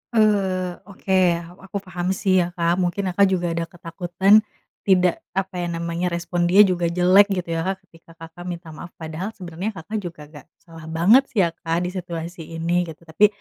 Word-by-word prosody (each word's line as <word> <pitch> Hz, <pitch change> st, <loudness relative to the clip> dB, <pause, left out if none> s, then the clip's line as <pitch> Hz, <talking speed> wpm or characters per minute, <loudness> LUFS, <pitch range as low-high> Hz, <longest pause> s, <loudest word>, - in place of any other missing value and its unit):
Eee, 190 Hz, -5 st, +2 dB
oke, 195 Hz, 0 st, -7 dB, 0.5 s
aku 195 Hz, +1 st, -5 dB
paham 180 Hz, -2 st, -4 dB
sih 190 Hz, -1 st, +2 dB
ya, 175 Hz, -, +1 dB
Kak. 170 Hz, +1 st, +1 dB
Mungkin 185 Hz, +1 st, -1 dB
Kakak 200 Hz, +2 st, +4 dB
juga 175 Hz, -2 st, 0 dB
ada 165 Hz, 0 st, -2 dB
ketakutan, 175 Hz, +4 st, +2 dB, 0.5 s
tidak, 180 Hz, -2 st, +3 dB, 0.2 s
apa 190 Hz, -1 st, -2 dB
ya 175 Hz, -, -2 dB
namanya, 170 Hz, +1 st, -2 dB
respon 175 Hz, 0 st, -1 dB
dia 195 Hz, +4 st, +7 dB
juga 180 Hz, -3 st, +1 dB
jelek, 180 Hz, +4 st, +5 dB
gitu 180 Hz, -4 st, -3 dB
ya 165 Hz, -, 0 dB
Kak. 190 Hz, 0 st, -1 dB
Ketika 165 Hz, -2 st, -20 dB
Kakak 165 Hz, +1 st, -11 dB
minta 170 Hz, -2 st, -6 dB
maaf. 175 Hz, +3 st, -10 dB
Padahal 165 Hz, +6 st, -6 dB
sebenernya, 185 Hz, +4 st, -5 dB
Kakak 210 Hz, +6 st, -4 dB
juga 175 Hz, -5 st, -8 dB
nggak 145 Hz, -, -13 dB, 0.2 s
salah 165 Hz, -2 st, -12 dB
banget 195 Hz, +12 st, +4 dB
sih, 205 Hz, -7 st, +2 dB
ya 170 Hz, -, +1 dB
Kak, 165 Hz, +1 st, -2 dB
di 180 Hz, -, -2 dB
situasi 170 Hz, -2 st, -6 dB
ini, 175 Hz, +2 st, 0 dB
gitu. 160 Hz, +1 st, -11 dB
Tapi, 160 Hz, +6 st, +4 dB
175 Hz, 190 wpm, -22 LUFS, 170-190 Hz, 0.5 s, dia